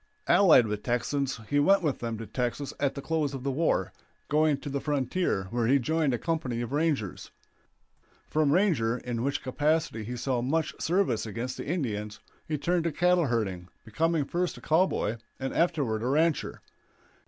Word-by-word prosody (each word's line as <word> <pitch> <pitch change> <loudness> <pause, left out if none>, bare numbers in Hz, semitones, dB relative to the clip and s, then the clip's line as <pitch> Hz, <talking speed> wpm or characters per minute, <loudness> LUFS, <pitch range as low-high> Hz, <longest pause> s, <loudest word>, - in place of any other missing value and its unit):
Allied 165 - +6
with 105 -1 -3
Texans 130 +2 -1
he 145 - +2
went 195 +6 +4
with 150 -4 0
them 115 -1 -3
to 115 - -6
Texas 125 +4 -3
at 140 -1 0
the 140 - -6
close 155 -4 -1
of 130 - -7
the 140 - 0
war, 160 +5 0 0.4
going 150 0 +3
to 145 - -9
the 140 -1 -2
frontier, 145 - 0
where 120 -1 0
he 135 +3 +5
joined 155 +2 +1
a 120 - 0
company 135 -6 -2
of 120 - -4
rangers. 145 - -1 1.0
From 155 -2 +2
ranger, 145 - +2
in 120 -1 -4
which 140 +3 -1
capacity 145 -2 0
he 120 +3 -5
saw 125 0 -1
much 150 +5 0
service 165 - +1
against 120 +4 -4
the - - -6
Indians, 105 - -3 0.3
he 155 - -1
turned 170 +3 0
to 170 - +1
cattle 175 +1 +3
herding, 95 -7 -2 0.2
becoming 160 +6 0
first 175 +4 -2
a - - -11
cowboy 160 - +1 0.2
and 135 0 -3
afterward 145 -11 +1
a 120 - -2
rancher. 155 +4 +1
140 Hz, 175 wpm, -28 LUFS, 120-160 Hz, 1.0 s, Allied